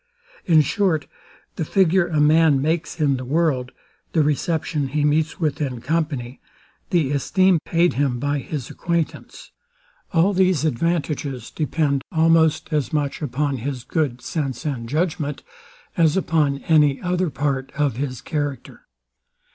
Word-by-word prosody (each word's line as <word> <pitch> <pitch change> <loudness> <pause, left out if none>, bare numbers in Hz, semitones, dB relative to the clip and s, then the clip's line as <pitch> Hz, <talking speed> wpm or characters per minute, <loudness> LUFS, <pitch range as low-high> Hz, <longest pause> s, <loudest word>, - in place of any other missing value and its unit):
In 160 -3 +5
short, 170 -2 0 0.5
the 165 - -1
figure 185 +1 +3
a 155 -3 0
man 155 -1 +4
makes 160 +4 -1
in 140 -3 +2
the 130 - -6
world, 135 -2 0 0.4
the 160 - +3
reception 150 0 -1
he 145 +2 0
meets 155 +2 +1
with 155 -3 -1
in 130 -4 -2
company, 140 -3 -2 0.5
the 160 -6 +1
esteem 185 +5 +2
paid 170 +1 +2
him 135 -3 0
by 145 +3 -1
his 135 -2 -6
acquaintance; 170 -2 -3 0.6
all 180 +2 +3
these 185 -4 +2
advantages 150 -3 -2
depend 150 -3 0
almost 160 -1 +3
as 150 0 0
much 150 -2 -1
upon 145 0 -1
his 130 0 -4
good 135 -4 -1
sense 140 -3 -3
and 120 -6 -3
judgment, 150 -1 -2 0.5
as 165 0 +3
upon 155 -6 +1
any 150 -4 +3
other 180 -1 0
part 135 -2 -2
of 145 -5 0
his 130 -3 -4
character. 145 -2 -5
150 Hz, 140 wpm, -22 LUFS, 140-165 Hz, 0.6 s, In